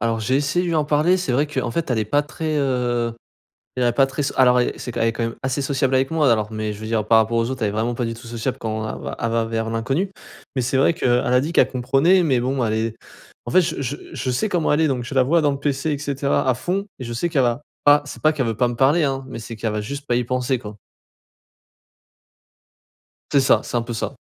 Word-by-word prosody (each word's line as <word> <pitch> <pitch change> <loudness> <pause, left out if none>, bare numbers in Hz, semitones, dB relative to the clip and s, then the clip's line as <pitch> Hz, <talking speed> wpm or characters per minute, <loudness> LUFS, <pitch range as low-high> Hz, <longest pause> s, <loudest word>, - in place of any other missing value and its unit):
Alors 115 0 0
j'ai 130 +5 +1
essayé 145 +5 0
de 175 - -2
lui 165 - 0
en 155 - +2
parler, 155 +5 +3
c'est 180 -8 -2
vrai 140 +5 +2
qu'en 130 -5 -2
fait 160 +3 -2
elle 120 - +1
est 110 - 0
pas 145 +7 +1
très, 155 +1 -3
heu, 120 -4 0 0.6
elle 125 - 0
est 120 - +3
pas 135 -1 +4
très 135 - -5
s - - -1
alors 125 -1 +5
et - - 0
c'est 125 - -6
q - - -5
elle 115 - +3
est 115 - 0
quand 115 - -2
même 115 - -3
assez 130 +2 -1
sociable 135 -1 0
avec 135 +2 +1
moi 155 -5 +3
alors, 110 -1 +1
mais 110 -1 -3
je 105 - -10
veux 110 - -6
dire 110 -2 -1
par 115 0 +5
rapport 110 +1 +2
aux 115 +2 0
autres, 130 -3 -4
elle 105 - +2
est - - -3
vraiment 115 +3 -1
pas 120 0 -2
du 115 - -3
tout 115 +1 -12
sociable 120 +3 -3
quand 110 -2 -3
elle - - -6
va - - -5
elle 115 - 0
va 115 0 +1
vers 115 0 -2
l'inconnu. 135 - -1 0.5
Mais 130 - +1
c'est 130 +3 0
vrai 135 +5 +4
qu'elle 125 - 0
a 125 0 +3
dit 155 +5 -3
qu'elle - - +4
comprenait, 135 +9 +3
mais 135 -6 +2
bon 130 +1 0
elle 110 -1 0
est 110 0 -1 0.5
en - - -4
fait 185 - +6
je 150 - -3
je 140 +2 -3 0.2
je 130 - -3
sais 125 - 0
comment 175 -6 +1
elle 150 - +2
est 160 - +3
donc 130 -3 -1
je 135 - -7
la 130 - +5
vois 165 +5 +3
dans 145 - +3
le 140 - -4
PC 140 +2 -1
et 145 - -2
cetera 140 -2 -1
à 130 - +4
fond. 190 - -2
Et 125 - -4
je 120 - -5
sais 170 +9 -1
qu'elle 145 -6 +2
va 120 +3 0 0.2
pas 145 0 +6
c'est - - -9
pas 155 - +4
qu'elle 140 -5 -1
veut 115 -2 -2
pas 125 0 +2
me 120 - -4
parler, 140 +7 +3
hein, 135 -1 -1
mais 115 - -7
c'est 115 0 -8
qu'elle 110 0 -2
va 105 - -2
juste 140 +7 -6
pas 120 - +1
y 125 - +2
penser 125 +1 -1
quoi. 105 -2 -9 2.5
C'est 140 - +4
ça, 130 - +4
c'est - - -4
un 120 - +1
peu 120 +1 -6
ça. 110 - -3
130 Hz, 290 wpm, -21 LUFS, 115-145 Hz, 2.5 s, fait